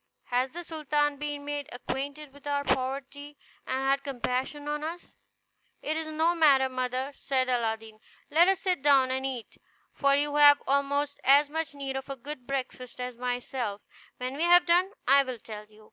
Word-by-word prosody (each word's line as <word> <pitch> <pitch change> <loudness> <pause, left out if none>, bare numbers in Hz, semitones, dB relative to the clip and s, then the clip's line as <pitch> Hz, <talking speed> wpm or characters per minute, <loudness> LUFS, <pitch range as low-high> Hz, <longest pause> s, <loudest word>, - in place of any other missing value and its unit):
Has 250 +2 +1
the 345 +5 -8
sultan 295 -3 -1
been 290 0 -5
made 290 -1 -4
acquainted 280 +3 -5
with 285 0 -13
our 285 0 0
poverty, 275 +2 -3 0.3
and 260 - -1
had 275 +1 +2
compassion 265 +2 -3
on 295 0 -2
us?" 335 +3 -6 0.7
"It 310 - -1
is 320 0 -3
no 320 +2 +1
matter, 280 -6 +4
mother," 255 +1 -2
said 265 -2 -1
Aladdin, 225 -3 -2 0.3
"let 335 +4 +5
us 385 -1 +2
sit 365 -7 0
down 270 -2 +4
and 265 +1 -1
eat; 250 -4 -7 0.3
for 280 -1 +3
you 290 +1 0
have 290 -1 +8
almost 285 +1 0
as 285 +2 +5
much 320 -1 -3
need 275 -1 -4
of 265 +1 -5
a 275 - -3
good 265 0 -8
breakfast 255 -2 -5
as 250 -1 -4
myself; 245 -3 -3 0.3
when 255 +1 -4
we - - -4
have 350 0 +6
done, 355 +2 +4 0.2
I 275 +2 +7
will 255 -3 -5
tell 210 -1 -9
you." 215 0 -21
275 Hz, 180 wpm, -28 LUFS, 255-295 Hz, 0.7 s, have